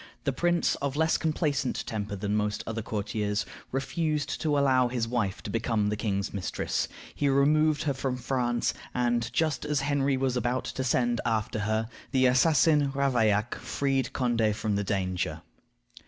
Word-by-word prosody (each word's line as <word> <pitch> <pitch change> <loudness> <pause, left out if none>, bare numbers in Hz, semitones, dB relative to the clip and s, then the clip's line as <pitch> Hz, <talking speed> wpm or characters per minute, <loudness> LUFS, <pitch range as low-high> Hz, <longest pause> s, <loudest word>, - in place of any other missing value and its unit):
The 140 - 0
prince, 175 +5 +2
of 140 -1 -2
less 160 +1 +2
complacent 150 -4 -1
temper 105 -2 -3
than 100 +2 -2
most 105 0 -1
other 115 0 -3
courtiers, 105 0 -2 0.3
refused 150 +2 -1
to 150 -3 +1
allow 130 -3 +4
his 120 -2 -2
wife 115 -5 -1
to 100 - -5
become 110 -2 0
the 105 - 0
king's 100 -2 -2
mistress. 100 -2 -2 0.3
He 145 - +1
removed 150 +3 +3
her 145 -3 +1
from 130 -1 -2
France, 120 -1 0 0.2
and, 120 -1 +1
just 155 +4 0
as 150 -2 0
Henry 140 -1 +1
was 130 -1 0
about 125 +1 0
to 130 - -3
send 120 -1 +1
after 110 -1 -1
her, 110 +1 0 0.2
the 130 -2 +3
assassin 145 +2 +4
Ravaillac 120 -6 +2
freed 135 -3 -1
Condé 115 -4 +1
from 105 -1 -1
the 100 - 0
danger. 90 -5 -2
125 Hz, 160 wpm, -28 LUFS, 110-140 Hz, 0.3 s, allow